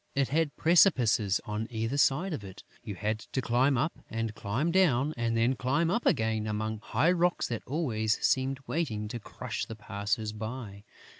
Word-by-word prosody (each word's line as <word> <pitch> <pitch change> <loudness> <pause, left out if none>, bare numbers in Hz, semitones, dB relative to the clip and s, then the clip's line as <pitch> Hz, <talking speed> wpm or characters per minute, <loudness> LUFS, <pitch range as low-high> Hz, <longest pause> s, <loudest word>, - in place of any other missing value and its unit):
It 135 -1 +1
had 150 -1 0
precipices 125 - +4
on 105 +1 -3
either 115 +2 -2
side 160 +8 +2
of 115 - -5
it; 95 0 -10 0.2
you 105 - -6
had 110 +4 -2
to 130 - -4
climb 130 +2 +2
up 155 +8 -1
and 115 -1 -3
climb 120 +12 -1
down 155 -6 +3
and 115 -1 0
then 115 +3 +3
climb 145 +7 +1
up 235 +5 0
again 110 -1 +1
among 110 +1 -2
high 145 +9 +1
rocks 175 0 +1
that 115 -2 -3
always 115 -8 0
seemed 135 +1 +1
waiting 110 -10 -2
to 120 - -5
crush 115 +1 -5
the 110 - -7
passers 105 +1 -3
by. 110 -2 -7
115 Hz, 175 wpm, -29 LUFS, 110-140 Hz, 0.2 s, precipices